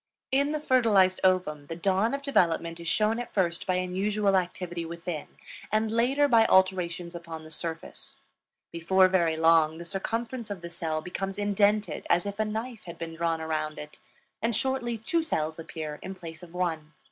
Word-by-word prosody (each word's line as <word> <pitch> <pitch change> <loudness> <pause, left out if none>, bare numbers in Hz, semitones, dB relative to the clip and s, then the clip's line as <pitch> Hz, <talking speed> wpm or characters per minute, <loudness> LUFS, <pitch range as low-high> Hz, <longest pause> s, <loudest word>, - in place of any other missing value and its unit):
In 280 +2 +2
the 305 - -1
fertilized 220 -10 +4
ovum 180 -6 +1
the 165 - -5
dawn 195 +7 +1
of 280 - -6
development 170 - +1
is 170 - -7
shown 215 +6 +2
at 245 - -6
first 170 -4 0
by 185 - +2
unusual 195 +3 +1
activity 175 -1 -2
within 170 -1 -5 0.4
and 215 +1 +1
later 260 +6 +3
by 230 -4 +5
alterations 180 -2 +2
upon 165 -2 -7
the 155 - -11
surface. 165 0 -5 0.6
Before 185 +3 +4
very 170 -4 +2
long 160 -1 +4
the 170 - -8
circumference 230 +6 -3
of 200 -4 -5
the 170 0 -7
cell 160 -2 -2
becomes 195 +3 -4
indented 205 +1 +1
as 175 +2 +3
if 200 +1 -5
a 215 - +2
knife 220 +2 -5
had 170 - -8
been 165 -1 -6
drawn 165 0 -1
around 155 -1 -2
it, 150 0 -9 0.4
and 230 0 +1
shortly 255 -2 -1
two 285 +10 0
cells 160 - -2
appear 155 -2 -6
in 190 - -6
place 165 -3 -9
of 175 -2 -12
one. 165 -3 -2
185 Hz, 180 wpm, -28 LUFS, 165-215 Hz, 0.6 s, by